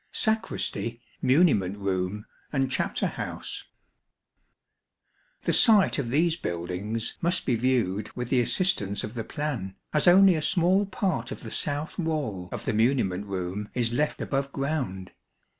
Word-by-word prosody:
Sacristy, 220 - -1 0.2
Muniment 130 - +3
Room 100 +1 -2 0.3
and 135 -2 0
Chapter 130 - 0
house. - - -4 1.8
The - - +1
site 215 - +5
of 125 -4 -2
these 160 +5 +2
buildings 95 - -3
must 175 +2 +1
be 125 - +2
viewed 110 -5 +1
with 125 -1 -4
the 130 -2 +3
assistance 115 - 0
of 105 - -5
the 115 -2 -3
plan, 125 -12 -4 0.2
as 150 +3 +2
only 190 +1 +8
a 160 - -1
small 185 +4 +3
part 190 -3 -1
of - - -6
the - - -7
south 150 +4 -2
wall 140 - -2
of - - -5
the 130 - 0
muniment 105 -4 +1
room 95 +2 -4
is 120 -2 0
left 150 +4 0
above 140 0 -1
ground. 135 -11 -3
130 Hz, 140 wpm, -27 LUFS, 100-155 Hz, 1.8 s, only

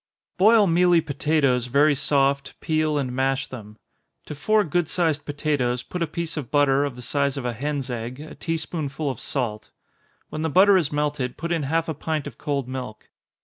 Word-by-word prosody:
_ - - -47
Boil 215 +2 +6
mealy 175 0 +4
potatoes 145 -4 +1
very 145 +4 +4
soft, 140 0 0
peel 155 -1 0
and 135 -3 -1
mash 135 +1 0
them. 105 -4 -10 0.5
To - - -6
four 210 +9 +2
good 175 0 0
sized 160 -3 0
potatoes, 140 -4 -1
put 180 - -6
a 170 - +1
piece 165 +1 -4
of 140 -6 -4
butter, 145 -1 +3
of 140 -4 -5
the 125 - -9
size 140 +2 0
of 130 - -4
a 120 - -1
hen's 140 +1 -3
egg, 120 +2 -5
a 155 +1 -9
tea 165 -1 -2
spoonful 150 -3 -3
of 125 - -8
salt. 110 -6 -3 0.6
When 155 - -5
the 160 - 0
butter 195 +6 +6
has 170 -6 +2
melted, 145 -4 -2
put 170 +1 -4
in 165 -2 +1
half 165 +1 +1
a 160 - -2
pint 155 0 -3
of 140 -5 -9
cold 140 -3 -2
milk. 125 -5 -7
145 Hz, 200 wpm, -24 LUFS, 130-160 Hz, 0.6 s, Boil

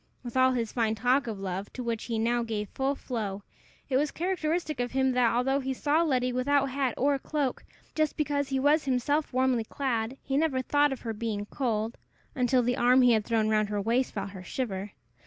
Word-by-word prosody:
With 240 -1 -7
all 260 0 +4
his 230 -3 -2
fine 225 -2 0
talk 250 +3 +2
of 215 -3 -4
love, 195 +1 -4
to 255 - -5
which 230 -2 -3
he 230 -2 -2
now 235 +2 +1
gave 215 -3 -3
full 270 +1 -1
flow, 205 -7 -4 0.4
it 260 - +1
was 295 +2 +1
characteristic 330 -3 -2
of 245 0 -2
him 265 0 +2
that, 250 -2 +3
although 270 +3 +2
he 265 -1 -3
saw 295 +5 +2
Letty 255 -6 +1
without 275 +2 +2
hat 265 -3 -1
or 280 +1 +2
cloak, 285 -2 -2 0.3
just 310 -1 0
because 285 -2 0
he 270 -1 0
was 295 +3 +3
himself 275 +4 0
warmly 255 -2 +2
clad, 240 0 -2
he 270 0 -1
never 285 -4 +1
thought 290 +2 +3
of 265 - -5
her 225 -2 -3
being 210 -2 -3
cold, 225 -1 -2 0.3
until 250 -1 +2
the 245 +2 0
arm 250 +1 +5
he 250 - +6
had 220 -2 +2
thrown 225 -2 +1
round 215 -1 +2
her 205 -1 -1
waist 235 +5 +1
felt 200 -1 -3
her 190 -2 -9
shiver. 200 -2 -4
250 Hz, 210 wpm, -28 LUFS, 225-275 Hz, 0.4 s, he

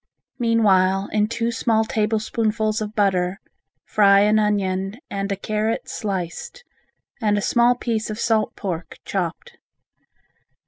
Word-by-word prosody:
Meanwhile 195 -5 +3
in 210 0 +2
two 230 +1 -1
small 225 -1 +1
tablespoonfuls 215 0 0
of 215 0 -5
butter, 190 -2 +1 0.5
fry 200 -1 +5
an 210 +1 +4
onion 195 -1 0
and 200 0 -3
a - - +1
carrot 215 +3 -2
sliced, 195 - -5 0.6
and 210 -2 +2
a - - 0
small 240 0 +3
piece 225 -3 -2
of 215 - -4
salt 225 -2 +1
pork 180 -4 -5
chopped. 485 0 -4
215 Hz, 125 wpm, -22 LUFS, 195-225 Hz, 0.6 s, fry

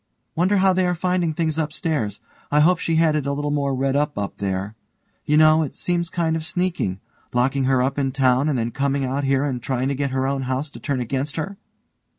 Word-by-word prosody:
_) - - -50 0.3
Wonder 185 +5 +2
how 190 0 +4
they 185 0 +2
are 180 - 0
finding 180 -1 0
things 160 0 -1
upstairs. 150 - -2 0.3
I 150 - +4
hope 175 +3 +4
she 165 - 0
had 160 -1 +3
it 145 -2 -1
a 140 - 0
little 145 +1 -2
more 140 -2 0
red 135 +1 0
up 145 -2 0
up 100 -1 -4
there. 95 +1 -2 0.5
You 150 - +3
know, 155 0 +6
it 150 - -3
seems 170 -1 -1
kind 165 -2 0
of 160 - -3
sneaking. 170 - -1 0.4
Locking 130 +2 +2
her 130 -1 +3
up 135 +2 -1
in 135 -1 0
town 130 +1 +2
and 140 - 0
then 115 0 -1
coming 140 +1 0
out 135 +2 -1
here 135 0 +2
and 130 -4 -2
trying 130 +2 -1
to - - 0
get 140 +1 -1
her 130 0 -1
own 135 0 -1
house 135 +3 -2
to - - -10
turn 140 -4 -2
against 135 +5 -2
her! 165 +5 -3
140 Hz, 235 wpm, -22 LUFS, 130-160 Hz, 0.5 s, know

